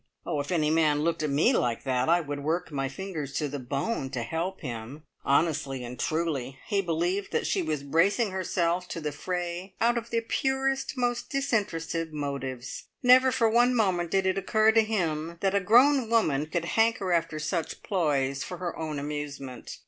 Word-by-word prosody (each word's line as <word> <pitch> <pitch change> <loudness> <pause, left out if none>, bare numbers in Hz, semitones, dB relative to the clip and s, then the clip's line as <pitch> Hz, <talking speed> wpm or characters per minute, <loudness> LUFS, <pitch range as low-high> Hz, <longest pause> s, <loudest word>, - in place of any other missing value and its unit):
Oh, 150 - -1
if 145 +3 -4
any 155 -4 +2
man 155 -2 +3
looked 165 0 0
at 155 - 0
me 150 - +3
like 120 - 0
that, 130 +1 0
I 175 +1 +4
would 145 -2 -5
work 165 +3 -1
my 135 -2 -2
fingers 150 -2 -5
to 150 +2 -1
the 145 0 -5
bone 135 - -2
to 125 -3 -3
help 170 +9 -3
him. 125 +2 -6 0.2
Honestly 140 -3 +1
and 120 0 -8
truly, 150 -6 -1
he 200 -2 +1
believed 175 +3 -1
that - - 0
she 190 - +1
was 155 -4 -2
bracing 190 - +2
herself 180 -1 0
to 170 - -5
the 150 -2 -3
fray 180 +4 -4
out 235 +1 +3
of 230 0 -12
the 230 -1 0
purest, 270 +3 -1
most 245 -1 -1
disinterested 170 - -1
motives. 135 -4 -4 0.2
Never 255 +1 +7
for 230 -2 +2
one 240 +3 +4
moment 185 -6 +1
did 190 +2 +1
it 190 +1 +1
occur 215 +3 +3
to 225 0 +5
him 170 -7 -2
that 195 -1 +1
a 200 - +4
grown 245 +5 +5
woman 155 -11 +2
could 170 +1 -2
hanker 225 -1 +1
after 165 -2 0
such 155 +1 -3
ploys 140 -7 0
for 180 - -6
her 175 -1 -4
own 155 -2 -4
amusement. 140 -3 -6
165 Hz, 185 wpm, -28 LUFS, 145-200 Hz, 0.2 s, Never